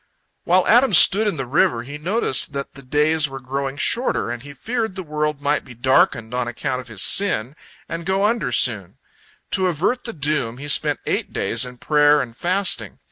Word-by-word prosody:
While 180 +1 +3
Adam 240 -3 +4
stood 205 +6 +6
in 200 - -1
the 135 - -3
river, 135 -2 +1
he 145 +4 -9
noticed 170 - +1
that 140 0 -5
the 140 - -12
days 150 +3 +1
were 135 0 -8
growing 135 +2 -4
shorter, 235 - -1
and 120 -1 -6
he 145 +3 -11
feared 220 - -4
the 190 - -5
world 150 -2 -3
might 145 +1 0
be 120 - -13
darkened 120 -2 +1
on 125 -1 -2
account 130 +2 -3
of 125 - -16
his 105 -5 -1
sin, 140 - 0 0.3
and 165 0 -5
go 190 +3 0
under 215 - 0
soon. 105 -7 0 0.5
To 190 -1 +1
avert 185 - -1
the 230 - -5
doom, 140 -6 -2
he 145 +2 -8
spent 140 - +2
eight - - -2
days 130 - -1
in 125 0 -12
prayer 150 +2 +3
and 120 -4 -5
fasting. 175 - 0
145 Hz, 195 wpm, -21 LUFS, 125-185 Hz, 0.5 s, stood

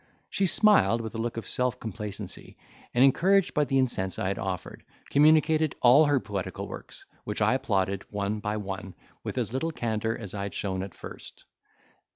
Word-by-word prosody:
She 195 - +1
smiled 200 - +5
with 110 -1 -6
a 115 - -5
look 115 0 -3
of 115 - -5
self 125 0 0
complacency, 105 -3 -7 0.3
and 120 - +4
encouraged 190 +8 +3
by 150 - +2
the 135 0 0
incense 105 -8 0
I 95 - -1
had 100 - -3
offered, 95 -3 -5 0.3
communicated 155 +1 +4
all 130 +6 +7
her 145 -2 +3
poetical 100 -5 -5
works - - -10 0.2
which 105 - -4
I 110 +3 +3
applauded, 100 -7 0
one 105 +1 -2
by 105 +1 -2
one, 95 -2 -6 0.3
with - - -5
as - - -1
little 160 +5 -1
candour 115 -5 -2
as 105 -5 -6
I 100 - -4
had 100 0 -5
shown 95 -2 -2
at 95 -1 -7
first. - - -9
115 Hz, 185 wpm, -27 LUFS, 100-135 Hz, 0.3 s, all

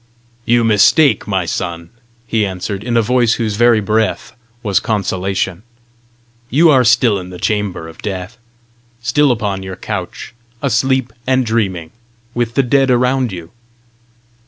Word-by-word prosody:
"You 120 0 +3
mistake, 115 +5 +4
my 95 -3 0
son," 85 0 -4 0.3
he 115 -2 0
answered, 95 +1 -4
in 120 0 0
a 115 - +3
voice 120 0 +2
whose 110 -3 -2
very 120 0 +4
breath 110 +1 -1 0.3
was 100 -4 +2
consolation. 95 -3 -2 0.9
"You 160 +4 +5
are 130 -3 +5
still 115 -2 +3
in 90 0 -9
the 90 - -9
chamber 105 -5 -2
of 80 - -13
death, 95 +3 -5 0.6
still 140 +4 +3
upon 105 -5 -2
your 95 -1 -7
couch, 95 +1 -6 0.3
asleep 130 -1 0
and 130 -1 +2
dreaming, 95 -8 -1 0.4
with 120 -1 -2
the 135 - +3
dead 135 +2 +2
around 125 0 +2
you." 85 -2 -8
110 Hz, 140 wpm, -16 LUFS, 95-120 Hz, 0.9 s, You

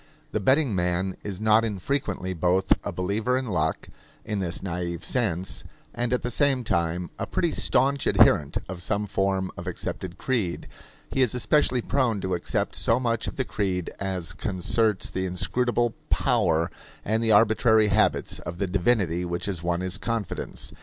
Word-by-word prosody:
The - - 0
betting 130 +4 +3
man 90 +1 0
is 100 -2 -4
not 110 +1 +4
infrequently 100 -3 -2
both 90 +2 +3
a - - -3
believer 105 +7 0
in 130 - -2
luck, 90 -9 -1 0.4
in 105 -2 -2
this 90 -2 -3
naive 85 -2 -3
sense, 95 -8 -1 0.3
and 120 0 -2
at 125 - 0
the 125 - -2
same 135 -1 +2
time 85 -3 -1
a - - -2
pretty - - 0
staunch 140 0 +1
adherent 75 -2 +4
of 90 -1 -6
some 100 +3 0
form 95 -1 0
of - - -8
accepted 90 -1 -5
creed. 110 -10 -1 0.4
He 135 - +1
is 125 -2 +2
especially 125 -1 +2
prone 125 -6 +1
to 95 0 -2
accept 85 - -1
so 115 +2 +2
much 115 -3 -1
of - - -4
the 130 - -1
creed 95 -6 -2
as 95 -2 -3
concerts 100 +2 0
the 95 0 -2
inscrutable 120 +6 0 0.2
power 80 0 +2 0.3
and 110 +2 +1
the 110 - +2
arbitrary 110 0 +5
habits 105 +2 +1
of 85 - -7
the 100 - 0
divinity 90 -2 +1
which 85 0 -3
has 95 -5 -3
won 85 0 -1
his 95 +2 -2
confidence. 115 -4 -3
100 Hz, 165 wpm, -26 LUFS, 90-115 Hz, 0.4 s, arbitrary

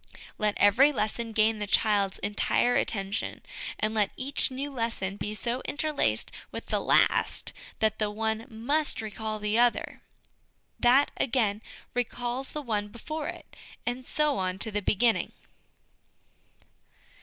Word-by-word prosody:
Let 210 -1 +1
every 225 +9 +6
lesson 230 -2 -2
gain 220 0 +2
the 210 - -3
child's 200 -2 +2
entire 210 +4 +2
attention, 200 -3 -1 0.4
and 215 +1 +1
let 210 -2 +2
each 275 +2 +1
new 275 +2 -5
lesson 230 -6 -2
be 210 +1 -4
so 240 +3 -2
interlaced 305 0 0 0.2
with - - -7
the - - 0
last - - +2 0.2
that 220 -1 +1
the 215 -1 +1
one 220 +1 -2
must 280 +8 0
recall 220 0 -4
the 210 +2 0
other; 240 0 +2 0.8
that, 255 +4 +5
again, 225 -5 +1 0.3
recalls 245 +2 -2
the 300 - -5
one 210 -4 -1
before 295 +8 -5
it, - - -8 0.3
and 245 +1 -2
so 300 +2 +1
on 185 0 -1
to 220 +3 0
the 205 0 -1
beginning. 225 +3 +2
225 Hz, 135 wpm, -28 LUFS, 210-255 Hz, 0.8 s, every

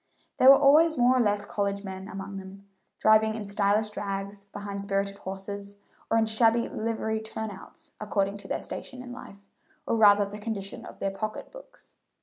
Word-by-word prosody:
There 260 - +7
were 275 - +10
always 310 +3 +5
more 245 +1 +4
or - - +3
less 205 -2 +1
college 200 -2 -2
men 190 -1 -7
among 195 -1 -7
them, 195 +1 -10 0.3
driving 220 0 +4
in 215 -2 -5
stylish 205 +1 +1
drags 200 0 -5
behind 200 0 -6
spirited 200 0 -2
horses 200 +1 -7 0.3
or 225 - +3
in 225 - +3
shabby 225 +1 +3
livery 220 0 -2
turn 220 0 -5
outs, 190 - -13
according 200 -1 -1
to 200 - -10
their - - -3
station 255 -1 -7
in 250 - -9
life, 200 -5 -12 0.4
or - - 0
rather 205 -2 +6
the 205 +1 -8
condition 205 -2 -5
of - - -11
their 195 - -2
pocket 215 +2 -5
books. - - -15
205 Hz, 180 wpm, -27 LUFS, 200-220 Hz, 0.4 s, were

